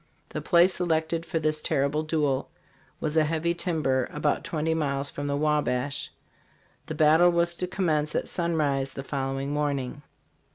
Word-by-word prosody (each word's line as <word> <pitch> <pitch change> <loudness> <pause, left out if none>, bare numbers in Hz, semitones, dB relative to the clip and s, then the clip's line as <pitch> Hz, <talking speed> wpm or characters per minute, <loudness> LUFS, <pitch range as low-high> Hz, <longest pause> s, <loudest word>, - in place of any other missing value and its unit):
The - - -4
place 175 +1 +4
selected 165 -1 -1
for 165 - -1
this 155 -1 0
terrible 145 0 +1
duel 150 -4 0 0.5
was 155 0 -2
a 160 - +5
heavy 165 +2 0
timber 155 -8 0
about 150 +1 0
twenty 160 -1 -1
miles 140 -3 -1
from 145 0 -4
the 140 0 0
Wabash. 145 -2 0 0.8
The 155 - -4
battle 160 +3 +5
was 170 0 +1
to 180 - -2
commence 155 -5 0
at - - 0
sun 170 -1 -1
rise 135 -3 0
the 135 - -6
following 135 0 -3
morning. 145 -1 -2
155 Hz, 160 wpm, -27 LUFS, 140-165 Hz, 0.8 s, a